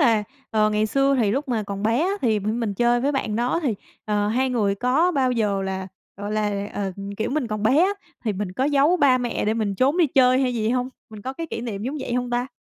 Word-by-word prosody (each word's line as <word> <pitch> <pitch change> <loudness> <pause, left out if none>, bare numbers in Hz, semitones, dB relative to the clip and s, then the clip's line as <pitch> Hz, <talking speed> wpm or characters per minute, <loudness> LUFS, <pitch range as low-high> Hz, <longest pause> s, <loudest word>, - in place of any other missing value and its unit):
là, 225 -7 +3 0.3
ờ, 215 -1 +3
ngày 215 0 +1
xưa 275 +4 +2
thì 210 - +2
lúc 270 +5 -2
mà 225 -3 0
còn 200 0 -5
bé 230 +4 +2
á 360 +4 +1
thì 220 -4 +2
mình 215 0 -2
chơi 240 +2 +2
với 280 +3 +1
bạn 220 -6 -1
đó 245 +8 0
thì, 245 -7 +1 0.3
ờ, 210 -1 0
hai 255 +4 +1
người 210 -5 +1
có 260 - +2
bao 260 -3 +2
giờ 205 -4 0
là, 190 0 -4 0.3
gọi 205 +2 -5
là, 205 -1 -1
ờ, 195 -2 -2 0.2
kiểu 220 - -2
mình 280 -3 0
còn 215 -1 -4
bé 255 +7 +4
á 395 - +2 0.3
thì 215 - +1
mình 190 -1 -4
có 255 - -1
giấu 290 +5 +3
ba 265 -6 +4
mẹ 240 -2 -2
để 215 +1 +1
mình 210 -3 -1
trốn 270 - +2
đi 335 - +5
chơi 255 -1 +4
hay 250 -2 0
gì 220 0 0
hông? 250 0 0 0.2
Mình 215 -2 -10
có 260 - -4
cái 330 +4 -5
kỷ 230 - -5
niệm 215 -4 -5
giống 270 +6 -3
vậy 245 -2 -3
hông 250 0 -1
ta? 245 +1 0
235 Hz, 260 wpm, -23 LUFS, 210-260 Hz, 0.3 s, đi